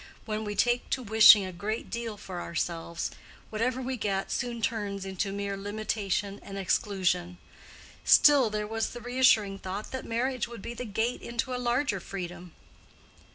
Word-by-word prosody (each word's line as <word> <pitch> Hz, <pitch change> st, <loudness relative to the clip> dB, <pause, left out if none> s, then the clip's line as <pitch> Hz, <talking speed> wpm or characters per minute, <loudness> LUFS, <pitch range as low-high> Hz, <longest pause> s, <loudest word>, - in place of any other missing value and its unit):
When 215 Hz, 0 st, -3 dB
we 205 Hz, -1 st, -4 dB
take 240 Hz, +2 st, +1 dB
to 260 Hz, -, -1 dB
wishing 215 Hz, -2 st, +8 dB
a 185 Hz, -, -5 dB
great 215 Hz, +6 st, -4 dB
deal 230 Hz, -2 st, -4 dB
for 180 Hz, -3 st, -7 dB
ourselves, 170 Hz, 0 st, -3 dB, 0.4 s
whatever 245 Hz, +4 st, -1 dB
we 260 Hz, 0 st, -3 dB
get 195 Hz, -3 st, -2 dB
soon 240 Hz, -2 st, -2 dB
turns 205 Hz, -3 st, -2 dB
into 195 Hz, +1 st, -2 dB
mere 200 Hz, 0 st, -3 dB
limitation 205 Hz, -1 st, -2 dB
and 195 Hz, -, -8 dB
exclusion. 180 Hz, -2 st, 0 dB, 0.7 s
Still 280 Hz, -6 st, +6 dB
there 210 Hz, 0 st, -2 dB
was 225 Hz, +1 st, -2 dB
the 240 Hz, -, -7 dB
reassuring 235 Hz, -5 st, +3 dB
thought 195 Hz, +3 st, -5 dB
that 260 Hz, -, -4 dB
marriage 245 Hz, +1 st, -1 dB
would 235 Hz, -4 st, -10 dB
be 235 Hz, -, -5 dB
the 250 Hz, +1 st, -6 dB
gate 225 Hz, +3 st, -1 dB
into 235 Hz, +2 st, -3 dB
a 250 Hz, -, -2 dB
larger 240 Hz, -3 st, +1 dB
freedom. 175 Hz, -2 st, -7 dB
215 Hz, 160 wpm, -29 LUFS, 195-240 Hz, 0.7 s, wishing